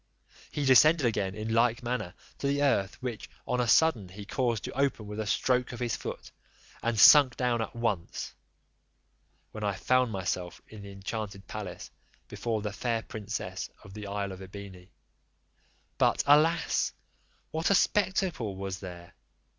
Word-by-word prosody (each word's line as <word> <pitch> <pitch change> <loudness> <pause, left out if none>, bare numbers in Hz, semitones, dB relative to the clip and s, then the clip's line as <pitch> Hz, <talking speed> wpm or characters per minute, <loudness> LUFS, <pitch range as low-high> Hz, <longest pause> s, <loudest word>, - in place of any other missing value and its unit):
He 145 - -2
descended 145 +3 +6
again 100 -4 0
in 110 +1 -3
like 115 +1 +2
manner 115 -7 -3 0.2
to 140 - -1
the 140 +1 +1
earth, 100 -8 +1
which 120 -4 -5 0.2
on 125 0 +1
a 120 - 0
sudden 115 - +4
he 100 +3 -9
caused 120 0 -1
to - - -5
open 135 -5 0
with 105 +1 -6
a 110 - -2
stroke 125 +3 +1
of 120 - -7
his 120 -3 -1
foot, - - -7 0.5
and 115 -2 0
sunk 140 -1 +8
down 120 -2 +1
at 110 - -5
once, 110 -7 -2 1.2
when 110 - -7
I 100 -2 0
found 130 +4 +2
myself 90 -2 -3
in 110 -2 -11
the 100 0 -9
enchanted 100 0 -6
palace, 100 -5 -7 0.4
before 110 -3 -3
the 105 -1 -3
fair 115 +2 -1
princess 110 0 -5
of 100 - -13
the 105 -1 -7
isle 100 -1 -3
of 95 0 -9
Ebene. 95 -1 -10 1.1
But, - - +3
alas! 150 +3 +3 0.6
what 160 +1 0
a 200 - +5
spectacle 185 - +1
was 95 0 -5
there! 90 -1 -10
110 Hz, 160 wpm, -29 LUFS, 100-125 Hz, 1.2 s, sunk